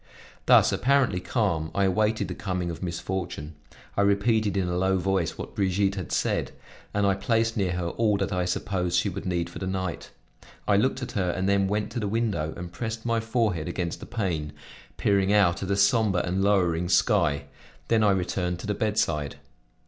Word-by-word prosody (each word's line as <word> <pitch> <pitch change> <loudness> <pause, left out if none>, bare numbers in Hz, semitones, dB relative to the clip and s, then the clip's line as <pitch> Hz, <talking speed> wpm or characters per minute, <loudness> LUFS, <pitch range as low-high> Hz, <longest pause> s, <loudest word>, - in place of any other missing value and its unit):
Thus, - - +6
apparently 130 -7 +2
calm, 90 -6 -1
I 100 - +2
awaited 105 +3 +1
the - - -4
coming 90 -3 -3
of 85 - -8
misfortune; 85 -3 -4 0.4
I - - +2
repeated 100 +1 +2
in 95 -2 +1
a 90 - -1
low 95 +1 +2
voice 95 -2 0
what - - -7
Brigitte 95 0 +1
had 95 -4 -6
said, - - 0 0.4
and 105 0 +1
I 100 - +4
placed 115 +2 0
near 95 -4 0
her 90 -1 -2
all 105 +1 +1
that 100 0 -2
I 90 -1 0
supposed 90 0 -1
she - - +1
would - - -6
need 85 -2 -1
for - - -9
the 95 - -3
night; 95 -2 -3 0.6
I 100 - +4
looked 130 +5 +1
at 125 - -5
her, 95 -7 0
and 95 +2 -1
then 100 -1 +3
went 105 +1 -1
to - - -3
the 105 - -2
window 100 -8 -1
and 85 0 -7
pressed 110 +5 -5
my 115 -1 +1
forehead 110 -8 0
against 85 -1 -3
the - - -9
pane, 90 -10 -2 0.4
peering 100 -1 +2
out 100 -4 +3
at 95 - -4
a 100 - +1
somber 100 -2 +3
and 95 +2 -1
lowering 90 -4 +2
sky; 75 -5 +2 0.4
then 110 -1 +3
I 105 - +5
returned 90 -2 0
to - - -7
the 105 - 0
bedside. 85 -9 -1
95 Hz, 195 wpm, -26 LUFS, 90-105 Hz, 0.6 s, Thus